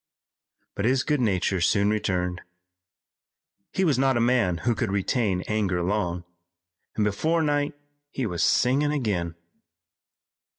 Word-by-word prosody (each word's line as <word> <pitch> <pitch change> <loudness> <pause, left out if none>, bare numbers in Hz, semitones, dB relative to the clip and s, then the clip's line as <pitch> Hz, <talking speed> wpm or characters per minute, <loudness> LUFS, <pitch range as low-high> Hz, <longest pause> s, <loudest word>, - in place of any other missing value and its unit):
But 100 - -3
his 130 +2 +2
good 150 -3 0
nature 95 -4 0
soon 100 +3 +3
returned. 90 -4 -1 1.3
He 190 - 0
was 145 -7 +2
not 135 -2 +3
a - - +1
man 115 -7 +2
who 120 - +3
could 115 -2 -2
retain 100 -1 0
anger 100 -5 0
long, 90 -2 -1 0.7
and 105 - +1
before 160 +11 +1
night 145 0 0 0.3
he 135 -3 -3
was 90 -6 -3
singing 135 - +3
again. 100 - -2
105 Hz, 130 wpm, -25 LUFS, 95-130 Hz, 1.3 s, soon